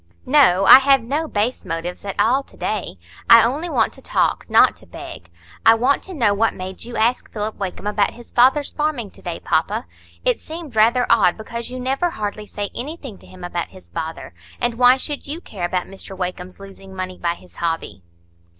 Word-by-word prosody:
"No, 250 -10 +4
I 260 - +11
have 270 -2 +4
no 295 +7 -2
base 220 0 -1
motives 165 +2 -5
at 195 - -5
all 255 +5 +3
to - - -19
day. 210 - -3 0.3
I 230 -1 +9
only 290 +9 -1
want 275 -7 +1
to - - -12
talk, - - 0
not - - +5
to - - -15
beg. 85 - -10 0.3
I 225 - +7
want 250 +5 +2
to 375 - -8
know 230 -8 +3
what 220 +2 +1
made 185 0 -7
you 240 0 -8
ask 235 +3 0
Philip 215 0 -4
Wakem 195 0 -5
about 210 -1 +1
his 240 0 -14
father's 265 +4 +3
farming 290 -9 -2
to - - -16
day, 175 -2 -5
papa? 205 +9 0 0.4
It - - +2
seemed 315 -5 -9
rather 235 +3 +4
odd, 195 -6 +4
because 235 +2 -6
you 255 +1 -6
never 270 +7 0
hardly 210 -6 -5
say 205 -1 -5
anything 270 - -7
to - - -17
him 185 -1 -13
about 175 -1 -3
his 185 - -16
father; 160 - -6 0.3
and 240 0 0
why 250 +2 +5
should 290 +2 -5
you 305 +4 -4
care 195 - -5
about 180 0 -1
Mr 195 0 -10
Wakem's 180 0 -5
losing 195 -1 -12
money 185 -1 -5
by 170 0 -1
his 90 -2 -19
hobby?" 165 - -3
220 Hz, 205 wpm, -21 LUFS, 185-260 Hz, 0.4 s, I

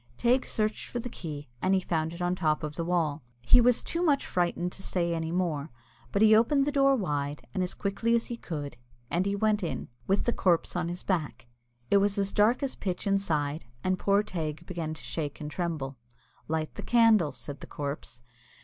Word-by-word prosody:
Teig 250 +2 +2
searched 215 -1 -1
for - - -4
the 240 +1 -3
key, 150 -9 -6
and 190 +1 +3
he - - +3
found 160 -3 -1
it 170 +1 -5
on 175 0 +1
the 180 - -6
top 155 -2 +1
of 150 -1 -3
the 165 - -3
wall. 165 -4 0 0.2
He 245 - +6
was 245 0 +4
too 335 - -2
much 295 -6 +3
frightened 175 0 0
to 190 - -9
say 170 -3 0
any 165 -1 -2
more, 165 -5 -1 0.4
but 200 - +3
he 220 0 +8
opened 275 +5 +4
the 295 - 0
door 275 -1 +4
wide, 145 - -2
and 190 - -1
as 180 - -2
quickly 210 +4 0
as 230 - +1
he 240 - -4
could, 145 - -6 0.3
and 180 +3 +1
he 200 - 0
went 215 0 +2
in, 170 - -3 0.2
with 195 - +2
the 240 - +1
corpse 175 -4 +1
on 175 -1 0
his 175 +1 -5
back. 165 -10 -2 0.5
It 200 - +7
was 200 +1 +2
as 195 0 0
dark 225 +7 +3
as 270 - -1
pitch 185 -3 -3
inside, 160 -8 0 0.2
and 185 0 +1
poor 200 +1 +3
Teig 160 -5 -4
began 165 -3 -4
to - - -12
shake 150 -4 -4
and 150 0 -5
tremble. 150 -6 -3 0.5
"Light 160 0 -2
the - - -7
candle," 225 -9 +4
said 145 -2 -8
the - - -9
corpse. 140 -4 -6
180 Hz, 215 wpm, -29 LUFS, 155-210 Hz, 0.5 s, he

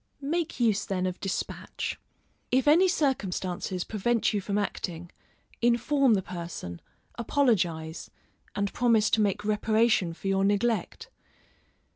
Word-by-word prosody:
Make 330 +1 -2
use 215 -4 +2
then 185 -2 -2
of 185 0 -3
despatch. 195 - -4 0.5
If 260 +3 +2
any 340 +6 +6
circumstances 190 - -1
prevent 225 +2 0
you 205 - 0
from 200 +1 -2
acting, 175 -4 -4 0.5
inform 240 +1 +3
the 190 - -1
person, 170 - -7 0.4
apologise, 180 - 0 0.5
and 200 0 -1
promise 230 -3 +3
to 220 - +3
make 205 0 0
reparation 215 -3 +2
for 195 - -7
your 195 0 +2
neglect. 225 - 0
210 Hz, 120 wpm, -28 LUFS, 185-240 Hz, 0.5 s, any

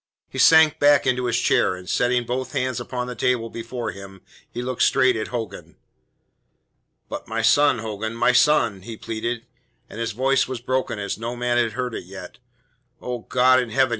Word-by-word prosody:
He - - -6
sank 160 -1 +6
back 145 0 +4
into 125 -1 0
his 120 0 +1
chair, 95 - +2
and 90 0 -12
setting 125 0 +1
both 125 +2 -4
hands 130 -3 -1
upon 125 0 -4
the 125 - -6
table 115 0 -1
before 115 +1 -5
him, 95 -1 -12 0.3
he 120 - -6
looked 125 -1 -4
straight 130 -2 +4
at 110 - -3
Hogan. 115 -3 -6 1.3
"But - - -7
my 115 0 -2
son, 145 +3 +4
Hogan, 110 0 -5
my 115 - +3
son?" 120 -5 +3
he 110 +3 -9
pleaded, 115 +2 -4 0.4
and 110 - -10
his 115 -2 -2
voice 135 +4 +1
was 130 -2 -5
broken 130 -1 -2
as 100 0 -4
no 115 +2 -4
man 120 0 0
had 115 -2 0
heard 125 0 -3
it - - -6
yet. 95 +1 -11 0.6
"Oh, 125 -1 -5
God 130 0 +4
in 125 - -5
heaven!" 130 +3 +2
120 Hz, 190 wpm, -22 LUFS, 115-130 Hz, 1.3 s, sank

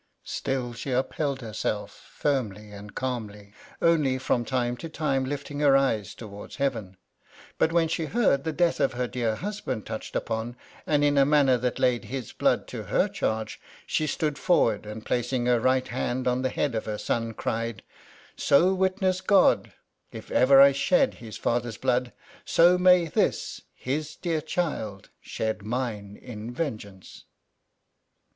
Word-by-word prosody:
Still 125 -3 -3
she 125 - -6
upheld 135 +2 -1
lierself, 105 -2 -3
firmly 105 -7 -3
and 105 0 -11
calmly, 105 -6 -5 0.3
only 150 -6 +3
from 130 -2 0
time 120 0 -1
to 165 - -7
time 135 -4 0
lifting 145 +1 -5
her 140 -2 +5
eyes 110 -8 0
towards 105 -3 -10
heaven; 115 -9 -2 0.6
but 160 - +3
when 165 -1 +3
she 165 0 -2
heard 155 - +2
the 160 - -1
death 170 +2 +1
of 135 - +2
her 125 0 -1
dear 120 -3 -1
husband 185 - -4
touched 110 - -6
upon, 115 +1 -2 0.3
and 145 -1 +2
in 145 -1 +3
a - - +7
manner 140 -3 +4
that 125 0 -1
laid 125 -2 +1
his 130 -3 -5
blood - - +1
to - - -5
her - - +2
charge, 110 0 -3 0.2
she 155 - 0
stood 150 0 -1
forward, 115 - +2
and 110 +1 -8
placing 125 0 -1
her 120 -1 +3
right 130 +2 +1
hand 125 +1 -2
on 125 +1 +1
the 130 - 0
head 140 +1 -1
of 110 - -2
her 105 -1 -3
son, 115 +2 -1
cried: 115 -2 -3 0.2
— - - -23
" - - -26
So 175 +7 +4
witness 185 0 +1
God, 195 -2 +4 0.4
if - - -10
ever 135 +1 +6
I 140 0 +9
shed 140 - +2
his 110 -2 -9
father's 120 -2 -1
blood, 125 0 0 0.3
so 175 +2 +5
may 180 -1 +5
this, 160 - -1
his 150 +4 -3
dear 165 -3 -2
child, 130 - -3
shed 110 -1 -3
mine 105 -3 -4
in 115 -2 -8
vengeance." 110 - -6
130 Hz, 165 wpm, -26 LUFS, 110-150 Hz, 0.6 s, I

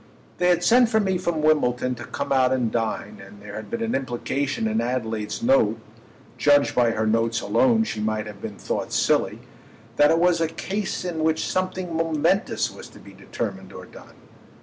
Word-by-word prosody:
They 180 - +3
had 175 -1 +2
sent 240 +2 +5
for 220 -1 +2
me 190 -3 0
from 170 -3 -2
Wimbledon 125 -5 +2
to 120 - -8
come - - -5
out 130 -1 +3
and 125 -4 0
dine, 115 -3 -3
and 100 +1 -14
there 105 - -10
had 110 - -7
been 235 0 -3
an 230 - -2
implication 135 0 -2
in 110 +1 0
Adelaide's 115 - -3
note—judged 145 - +1
by 120 -2 +3
her 110 -1 -1
notes 115 +1 +1
alone 235 -4 +3
she 110 - -4
might 110 0 -1
have 105 -2 -10
been 105 -2 -7
thought - - -3
silly—that 115 +7 0
it 165 - +4
was 170 0 +3
a 165 - +2
case 190 +4 -4
in 165 -3 -2
which 160 0 +1
something 185 -2 -2
momentous 165 +5 0
was - - -11
to - - -16
be - - -14
determined - - -6
or - - -9
done. - - -15
145 Hz, 185 wpm, -24 LUFS, 115-180 Hz, -, sent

